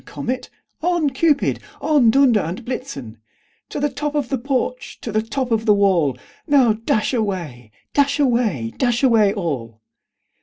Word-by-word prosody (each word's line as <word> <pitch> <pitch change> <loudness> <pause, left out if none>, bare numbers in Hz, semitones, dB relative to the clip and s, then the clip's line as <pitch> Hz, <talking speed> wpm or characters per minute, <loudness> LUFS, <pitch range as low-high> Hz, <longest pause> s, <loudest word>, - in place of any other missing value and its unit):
Comet, 255 +1 -5 0.3
on! 340 -4 +1
Cupid, 290 +1 +1 0.2
on! 285 -5 +3
Dunder 250 -2 +4
and 185 +6 -5
Blitzen 140 - -6 0.5
To - - -4
the 290 - +1
top 295 0 -3
of 285 -4 -1
the 270 - 0
porch, 250 -2 -3
to 225 - -5
the 215 +1 +1
top 250 +3 -3
of 225 0 0
the 210 - +6
wall! 175 - +2 0.3
Now, 265 -7 +4
dash 215 +2 -1
away, 175 - -3 0.2
dash 280 0 +2
away, 235 - +1
dash 245 0 +1
away 225 -6 +4
all!" 135 - -4
235 Hz, 155 wpm, -20 LUFS, 195-275 Hz, 0.5 s, the